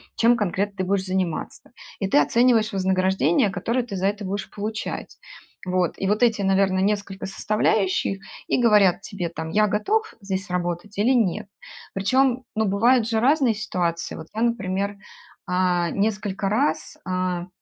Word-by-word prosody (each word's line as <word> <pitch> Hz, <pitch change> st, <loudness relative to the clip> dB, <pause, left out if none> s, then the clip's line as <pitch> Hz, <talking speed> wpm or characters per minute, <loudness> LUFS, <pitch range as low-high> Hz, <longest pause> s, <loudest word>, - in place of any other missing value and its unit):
чем 235 Hz, +1 st, +4 dB
конкретно 200 Hz, 0 st, -1 dB
ты 185 Hz, -, -1 dB
будешь 190 Hz, 0 st, 0 dB
заниматься. 185 Hz, +2 st, -3 dB, 0.3 s
И 195 Hz, -, -1 dB
ты 190 Hz, -, +4 dB
оцениваешь 230 Hz, -, +3 dB
вознаграждение, 190 Hz, -2 st, +2 dB
которое 230 Hz, +7 st, -1 dB
ты 220 Hz, -5 st, -7 dB
за 190 Hz, 0 st, -1 dB
это 205 Hz, 0 st, -2 dB
будешь 195 Hz, +1 st, -4 dB
получать. 215 Hz, +2 st, -5 dB, 0.5 s
Вот. 180 Hz, -2 st, 0 dB
И 195 Hz, -, -2 dB
вот 210 Hz, +4 st, +2 dB
эти, 225 Hz, -3 st, +3 dB
наверно, 190 Hz, -1 st, +2 dB
несколько 200 Hz, -1 st, -1 dB
составляющих 195 Hz, -1 st, 0 dB, 0.3 s
и 250 Hz, -, +1 dB
говорят 205 Hz, -5 st, +4 dB
тебе, 195 Hz, -4 st, -4 dB
там: 160 Hz, 0 st, -6 dB
"Я 210 Hz, +3 st, +3 dB
готов 430 Hz, -, 0 dB
здесь 195 Hz, -1 st, -4 dB
работать 175 Hz, +3 st, -3 dB
или 220 Hz, +6 st, +3 dB
нет". 215 Hz, -4 st, +1 dB, 0.5 s
Причём, 255 Hz, +5 st, +1 dB
ну, 220 Hz, 0 st, +1 dB
бывают 225 Hz, +4 st, +3 dB
же 225 Hz, -, +1 dB
разные 265 Hz, 0 st, +3 dB
ситуации. 175 Hz, -5 st, -2 dB
Вот 160 Hz, -, -9 dB
я, 220 Hz, -, -3 dB
например, 200 Hz, -3 st, -1 dB, 0.5 s
а, 180 Hz, -2 st, +1 dB
несколько 205 Hz, -1 st, -1 dB
раз, 255 Hz, +8 st, 0 dB
а, 185 Hz, -1 st, -2 dB
200 Hz, 155 wpm, -23 LUFS, 185-220 Hz, 0.5 s, чем